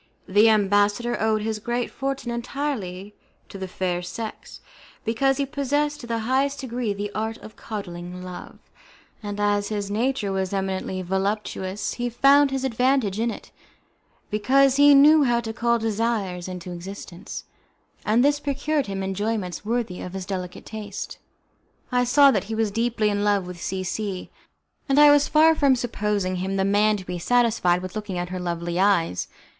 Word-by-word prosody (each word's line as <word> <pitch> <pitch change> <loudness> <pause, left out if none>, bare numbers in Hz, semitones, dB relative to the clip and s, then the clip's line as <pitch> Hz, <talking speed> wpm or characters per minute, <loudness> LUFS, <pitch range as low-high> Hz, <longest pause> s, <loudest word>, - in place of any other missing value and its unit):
The 210 +4 +5
ambassador 205 +3 +2
owed 215 -1 +1
his 220 -1 -2
great 240 +2 -2
fortune 270 -2 -3
entirely 235 -6 -4 0.4
to 195 - -9
the 190 - -4
fair 180 -1 -2
sex, 215 +5 -7 0.5
because 265 +4 +1
he 280 - 0
possessed 290 +2 -1
to 240 - -9
the 230 -1 -1
highest 275 +3 +1
degree 245 -3 -2
the 205 +1 -4
art 220 +1 -3
of 215 - -13
coddling 180 -4 -7
love; 180 -1 -9 0.6
and 205 -1 -5
as 205 0 +1
his 205 -2 -3
nature 225 -1 0
was 190 0 -2
eminently 190 -1 -2
voluptuous 190 +1 -2
he 245 0 -2
found 275 +4 +5
his 270 -1 -2
advantage 250 -4 +1
in 235 +1 +1
it, - - -8 0.8
because 265 +6 +3
he 285 0 +7
knew 300 +3 +7
how 240 -3 +2
to 225 -1 -5
call 235 0 +1
desires 220 -5 -1
into 180 -1 -7
existence, 180 +1 -8 0.6
and 230 +5 +3
this 290 0 +3
procured 285 0 -1
him 195 -1 -3
enjoyments 195 -2 -2
worthy 225 -4 -2
of 180 - -7
his 190 -1 -5
delicate 185 -2 -5
taste. 210 -2 -7 0.7
I 250 0 +2
saw 280 +3 +6
that 195 -7 0
he 220 +2 -4
was 220 -2 0
deeply 225 -1 +1
in 205 0 -1
love 205 -2 +2
with 180 -1 -9
C 190 0 -3
C, 190 0 -4 0.6
and 275 +1 +4
I 295 0 +9
was 290 0 +4
far 320 +1 +5
from 280 -4 +3
supposing 210 -6 -1
him 190 +2 -2
the 190 0 +1
man 210 +2 +3
to 190 - -9
be 180 -1 -4
satisfied 220 -4 +2
with 185 +2 -7
looking 205 -4 -4
at 175 0 -3
her 185 0 -4
lovely 175 0 -3
eyes. 180 - +2
215 Hz, 170 wpm, -24 LUFS, 190-245 Hz, 0.8 s, I